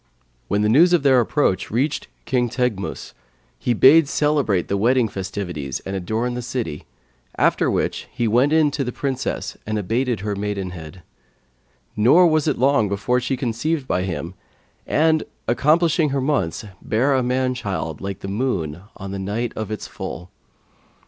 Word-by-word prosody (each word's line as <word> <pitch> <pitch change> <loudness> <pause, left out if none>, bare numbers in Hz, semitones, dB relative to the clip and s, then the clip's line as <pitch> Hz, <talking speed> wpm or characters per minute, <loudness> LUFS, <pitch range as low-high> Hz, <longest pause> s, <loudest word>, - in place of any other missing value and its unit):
When 100 +1 +1
the - - +3
news 165 +11 +5
of 175 - +3
their 135 -3 +5
approach 120 -4 +1
reached 135 +7 -1 0.2
King 120 -2 +1
Teghmus, 110 -9 -3 0.5
he 120 - 0
bade 145 +6 +6
celebrate 145 - +1
the 100 - -1
wedding 120 +4 +3
festivities 90 - -5
and 95 - -5
adorn 110 +6 -2
the 125 - -4
city; 120 - -4 0.5
after - - +2
which - - -1
he 120 - -1
went 125 +6 +3
in 160 0 +4
unto 145 -1 -1
the 125 - -3
Princess 135 0 -3
and 110 0 -1
abated 115 +3 -1
her 105 0 -2
maidenhead; 95 -5 -5 0.9
nor 130 +12 +6
was 155 -2 +2
it 150 - +1
long 125 -5 +3
before 105 +6 0
she 130 +1 -2
conceived 130 +4 -2
by 90 - 0
him 90 -1 -4 0.5
and, 160 +1 +3 0.3
accomplishing 155 +5 +3
her 135 0 -1
months, 130 - -1 0.2
bare 130 +6 +1
a 130 - +2
man 130 +1 0
child 95 -10 -4
like 100 -1 -5
the - - -5
moon 95 - -2 0.2
on 95 -1 -7
the 100 - -4
night 105 +5 -3
of 110 -1 -4
its 110 - -5
full. 90 +2 -7
120 Hz, 160 wpm, -21 LUFS, 100-135 Hz, 0.9 s, bade